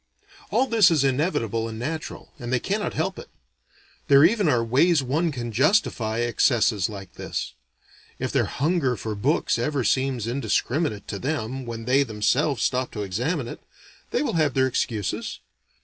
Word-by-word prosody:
All 250 +4 +2
this 225 -7 +5
is 155 -5 +2
inevitable 125 - 0
and 110 - -7
natural, 155 +7 -5
and 120 -1 -5
they 130 - +2
cannot 205 - -2
help - - -2
it. - - -11 0.8
There 140 0 +7
even 200 -2 +3
are 120 -4 +2
ways 140 +6 +3
one 155 +6 0
can 120 -4 -5
justify 120 - +1
excesses 115 -4 +2
like 100 -3 -9
this. - - -5 0.6
If - - -3
their - - +2
hunger 145 -3 0
for 110 +1 -4
books 125 +10 +1
ever 145 -4 0
seems 130 0 0
indiscriminate 120 0 -1
to 100 - -4
them 130 -2 -3
when 115 -1 -6
they 130 +3 +4
themselves 120 +3 +1
stop 130 0 0
to 105 - -3
examine 120 - -2
it, - - -8 0.5
they - - 0
will - - -1
have 155 -5 +1
their 130 -1 +4
excuses. 115 -5 -2
130 Hz, 165 wpm, -24 LUFS, 115-155 Hz, 0.8 s, There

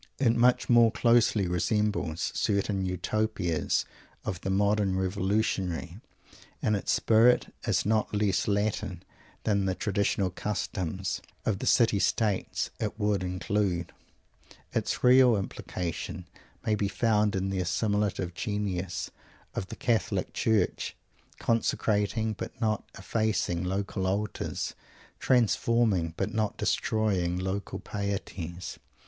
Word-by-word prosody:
It 120 -4 +3
much 120 +1 +3
more 120 -2 +6
closely 115 -5 +3
resembles 90 -2 0
certain 100 -2 0
Utopias 95 -2 0 0.4
of 90 - -3
the 95 - -3
modern 100 0 +2
Revolutionary. 95 -2 -1 0.6
In 110 - +1
its 100 - 0
spirit 115 +2 +4
it - - -4
is - - +2
not 110 0 +1
less 105 -3 +1
Latin 100 -3 -1 0.4
than 100 -3 +1
the 95 -1 0
traditional 100 -2 0
customs 95 -1 -3 0.2
of 100 -3 0
the - - -3
City 115 -4 +4
States 105 0 0
it 110 0 -3
would 105 -2 +1
include. 90 -1 -1 0.8
Its - - -1
real 125 -1 +7
implication 90 -2 -4 0.4
may 110 - +2
be 105 -1 +1
found 105 +1 +2
in 95 0 -1
the 95 - -1
assimilative 100 0 0
genius 95 -3 -3 0.4
of 95 - -3
the - - -7
Catholic 115 -2 0
Church, 110 -5 0 0.4
consecrating 110 -1 +1
but 105 - -7
not 110 -3 0
effacing 105 -6 0
local 95 +1 -2
altars; 105 +3 -2 0.5
transforming, 115 -7 +2
but 110 - -2
not 110 -2 -1
destroying, 95 -5 0
local 95 +2 -3
pieties. 90 -3 -5
100 Hz, 115 wpm, -28 LUFS, 95-110 Hz, 0.8 s, real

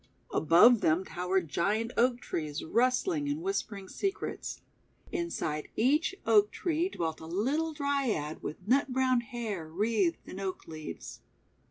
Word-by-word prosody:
Above 175 - +6
them 165 +4 +2
towered 180 0 -1
giant 210 +9 0
Oak 245 +1 +3
Trees 155 -2 -3
rustling 255 - +1
and 295 +3 -2
whispering 215 - -3
secrets. 390 - -3 0.5
Inside 340 - -2
each 300 - +2
Oak 210 -2 +5
Tree 340 - -1
dwelt 160 - -3
a 160 - -9
little 270 - 0
Dryad 275 - -1
with 180 +5 -7
nut 270 +5 +4
brown 255 -1 +2
hair 220 -8 -5
wreathed 195 -1 +1
in 190 - -7
oak 190 -1 -4
leaves. 155 - -8
225 Hz, 135 wpm, -30 LUFS, 170-280 Hz, 0.5 s, Above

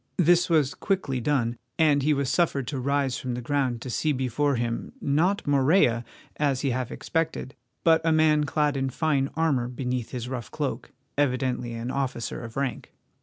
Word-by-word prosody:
This 175 +1 +4
was 150 -5 +3
quickly 170 -11 -1
done, 120 -3 0 0.2
and 150 -3 +4
he 150 +3 +2
was 140 -2 +1
suffered 140 -4 +1
to 140 -3 -3
rise 140 0 0
from 125 -2 -3
the - - -3
ground 130 -3 0
to 130 - -5
see 155 +5 +1
before 130 +2 0
him, 115 - -3
not 175 - +1
Morella, 135 -4 +3 0.3
as 140 -3 +1
he 140 - +1
half 125 -1 -2
expected, 160 -5 -2 0.3
but 165 -1 +5
a 165 - +2
man 155 -1 +4
clad 150 0 +1
in 135 0 0
fine 140 0 0
armour 145 -7 +1
beneath 125 -1 -3
his 125 -2 -5
rough 125 -3 -5
cloak, - - -3 0.3
evidently 125 -3 0
an 115 +2 -4
officer 130 -4 -3
of 115 +1 -8
rank. 135 -3 -3
135 Hz, 175 wpm, -26 LUFS, 125-150 Hz, 0.3 s, but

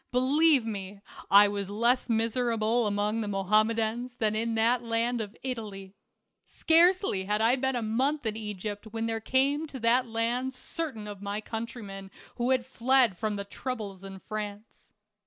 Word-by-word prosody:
Believe 270 +2 +3
me, 200 -2 -5 0.3
I 205 +1 +8
was 200 -1 -4
less 235 +5 +1
miserable 230 0 +1
among 210 +2 0
the 215 - -3
Mohammedans 220 +5 +1
than 215 -2 0
in 225 +1 -1
that 230 +2 +3
land 230 0 0
of 210 -1 -7
Italy. 210 -7 -6 0.5
Scarcely 335 - +3
had 210 +2 0
I 230 +3 +4
been 265 0 -1
a 240 - -1
month 260 +6 0
in 215 -1 -1
Egypt 210 -1 -5
when 225 +1 -3
there 225 0 -1
came 280 +6 +1
to 270 -3 -8
that 240 +2 +3
land 240 +3 -1
certain 255 -6 -5
of 205 -2 -8
my 205 +1 -3
country 230 +2 -6
men 195 -1 -8 0.3
who 240 0 0
had 255 -2 +2
fled 260 -3 +3
from 215 +2 -2
the 200 0 -5
troubles 205 -4 -6
in 195 0 -8
France. 210 +1 -7
225 Hz, 165 wpm, -28 LUFS, 210-250 Hz, 0.5 s, I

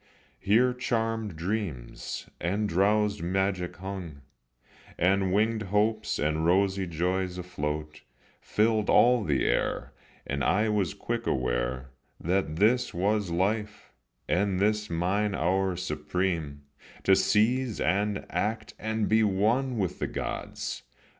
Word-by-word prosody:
Here 120 - +3
charmèd 115 -5 -1
dreams 85 - -4
and 100 +5 0
drowsèd 105 +2 +2
magic 90 0 -1
hung, 90 -6 -7 0.8
And 95 +2 +3
wingèd 110 +1 +1
hopes 110 +2 +1
and 75 +1 0
rosy 95 +2 +2
joys 90 +2 -1
afloat 75 -4 -4 0.4
Filled 110 0 +1
all 125 -2 +5
the 70 -5 +1
air, - - 0 0.3
and 70 0 -2
I 105 +3 +2
was 100 -6 0
quick - - -3
aware 65 +1 -1 0.3
That 90 -2 0
this 110 +7 +2
was 100 +2 +1
life, 105 +5 -2 0.3
and 95 0 +1
this 105 +1 +1
mine 100 +5 0
hour 95 +2 +1
supreme, 80 -2 -2 0.4
To 95 - +6
seize 110 +5 +2
and 100 +3 0
act 110 +2 -2
and 110 -1 -1
be 110 +1 +4
one 110 +6 +1
with 95 -5 -2
the - - -1
gods. - - -4
95 Hz, 120 wpm, -28 LUFS, 85-105 Hz, 0.8 s, To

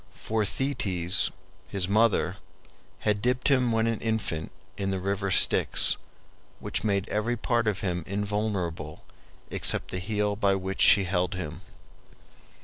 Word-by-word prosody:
For 110 -1 -1
Thetis 95 -8 0 0.4
his 95 -2 -1
mother 110 +2 +2 0.6
had 105 -1 +1
dipped 125 +3 +1
him 130 -3 +3
when 115 0 +2
an 115 -1 0
infant 110 -8 -2 0.2
in 95 -1 -2
the 95 - -1
river 100 +1 -1
Styx, - - +4 0.6
which - - -2
made 100 -2 0
every 115 +3 -1
part 120 0 0
of 100 -2 0
him 90 -3 -2
invulnerable 100 -6 -3 0.5
except - - 0
the 90 - -2
heel 105 +2 -1
by 100 -2 +2
which 95 0 -3
she 100 +1 +7
held 90 -1 0
him. 80 -5 -6
100 Hz, 140 wpm, -27 LUFS, 95-110 Hz, 0.6 s, she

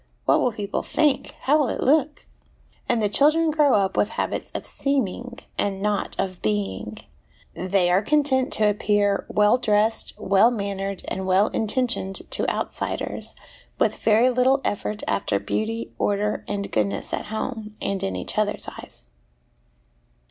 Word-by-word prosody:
what - - +4
will 250 - +2
people 205 -2 -3
think? 300 -3 0
how 295 +3 +3
will 280 -5 +1
it - - -3
look?' 295 +1 +1 0.6
and 225 - +2
the - - +3
children 310 +8 +4
grow 295 -4 +4
up 195 -2 +1
with 205 - +2
habits - - -3
of - - -4
seeming, 245 -3 -2 0.2
and 195 -1 -1
not 205 0 -1
of 185 -2 -3
being; 105 0 -2 0.6
they 185 0 +1
are 180 +2 +3
content 275 0 +2
to 215 - +3
appear 205 -1 +1
well 210 +4 +3
dressed, 215 0 +1
well 195 +4 +4
mannered, 200 -3 -3
and 190 0 -3
well 190 +3 +3
intentioned 220 -4 -1
to - - 0
outsiders, - - -2 0.4
with - - +2
very 225 +4 +4
little 255 +2 +3
effort 210 +1 -2
after - - 0
beauty, 225 +1 -3
order, 205 +1 0
and 200 -1 -3
goodness 100 -2 0
at - - -2
home, 220 0 -5
and 195 -1 -2
in 195 - -2
each - - -2
other's 210 0 -1
eyes. - - -11
210 Hz, 150 wpm, -24 LUFS, 195-250 Hz, 0.6 s, what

